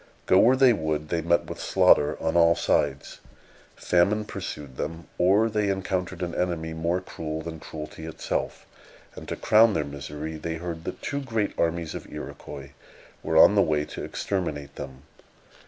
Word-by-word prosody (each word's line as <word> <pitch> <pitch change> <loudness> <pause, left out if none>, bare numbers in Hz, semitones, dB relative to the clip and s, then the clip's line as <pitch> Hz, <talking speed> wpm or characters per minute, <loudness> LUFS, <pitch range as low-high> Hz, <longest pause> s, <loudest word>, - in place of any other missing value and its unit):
Go 95 - +5
where 125 +3 +6
they 130 -2 +6
would, 80 -4 -2
they 85 -1 0
met 85 +1 +2
with - - -7
slaughter 75 - +4
on 80 - -1
all 85 0 +5
sides. - - 0 0.6
Famine 100 +5 +2
pursued 70 -9 -7
them, 80 +4 -5
or 100 +5 +4
they 105 -2 0
encountered 95 -1 -2
an 85 -1 -3
enemy 85 -3 -2
more 85 +3 -1
cruel 80 -3 -5
than 80 -1 -7
cruelty 80 +1 -8
itself; 80 - -3 0.5
and, - - -10
to - - -3
crown 110 0 +5
their 75 -3 0
misery, 75 +2 -6
they 80 +1 -4
heard 85 0 -6
that - - -6
two 140 -1 -2
great 115 -6 -1
armies 85 -1 -1
of - - -8
Iroquois 70 0 -8 0.5
were 80 - 0
on 90 - +8
the 100 - +5
way 75 -4 +1
to - - -7
exterminate 75 -8 -3
them.... 65 +1 -8
85 Hz, 170 wpm, -26 LUFS, 80-95 Hz, 0.6 s, on